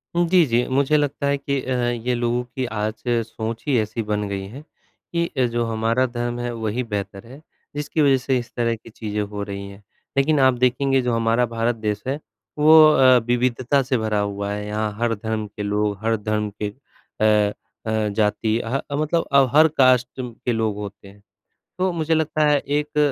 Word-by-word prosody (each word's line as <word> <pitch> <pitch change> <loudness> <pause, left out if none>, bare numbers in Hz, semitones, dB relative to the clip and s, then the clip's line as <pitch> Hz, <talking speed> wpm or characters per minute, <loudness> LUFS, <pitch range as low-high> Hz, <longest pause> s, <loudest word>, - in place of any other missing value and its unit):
हुँ, 175 0 +3
जी, 180 -2 +5
जी, 120 -2 +1
मुझे 140 +3 +2
लगता 145 -1 -1
है 140 0 +1
कि 140 0 -2
अ, 130 - -3
ये 120 0 -1
लोगों 120 +1 0
की 125 +1 -5
आज 110 -1 -3
सोच 115 -1 -2
ही 135 -4 +3
ऐसी 110 +1 -2
बन 105 -1 -2
गई 100 -1 -4
है 125 +8 -10 0.5
कि 170 0 +1
अ, 130 - +3
जो 120 0 -1
हमारा 115 +3 +1
धर्म 120 -1 -3
है 120 0 -3
वही 110 +2 -2
बेहतर 100 -2 -5
है, 135 +5 -12 0.3
जिसकी 150 +2 -1
वज़ह 140 -2 +5
से 130 0 0
इस 120 0 -9
तरह 115 -1 0
की 115 - -15
चीज़ें 105 -1 -4
हो 105 0 -4
रही 100 0 -6
हैं, 100 +1 -14 0.3
लेकिन 145 +2 +3
आप 130 -1 +5
देखेंगे 135 +1 +2
जो 125 -1 -1
हमारा 115 +1 +2
भारत 115 0 -1
देश 105 -2 -3
है 140 +3 -1 0.4
वो 155 +1 +8
अ, 130 -3 +6
विविधता 125 +2 +1
से 130 0 0
भरा 110 -2 -1
हुआ 100 0 -2
है 105 0 -4
यहाँ 105 0 -2
हर 115 -1 +1
धर्म 110 +1 -3
के 105 +1 -7
लोग, 105 0 -1
हर 115 0 +1
धर्म 105 0 -2
के 105 - -1
अ 105 -3 -1 0.3
अ, 110 -1 0
जाती 110 +1 +1
अ, 120 +4 -2
मतलब 155 +3 0
अब 135 -2 +5
हर 155 +1 +8
कास्ट 130 -2 +5
कु 125 -1 -4 0.2
के 120 - +1
लोग 110 -2 0
होते 100 -1 -8
हैं, 100 +1 -16 0.6
तो 185 0 +1
मुझे 165 -1 -1
लगता 155 -1 +1
है 145 0 +4
एक 150 +2 -3
120 Hz, 200 wpm, -22 LUFS, 105-135 Hz, 0.6 s, वो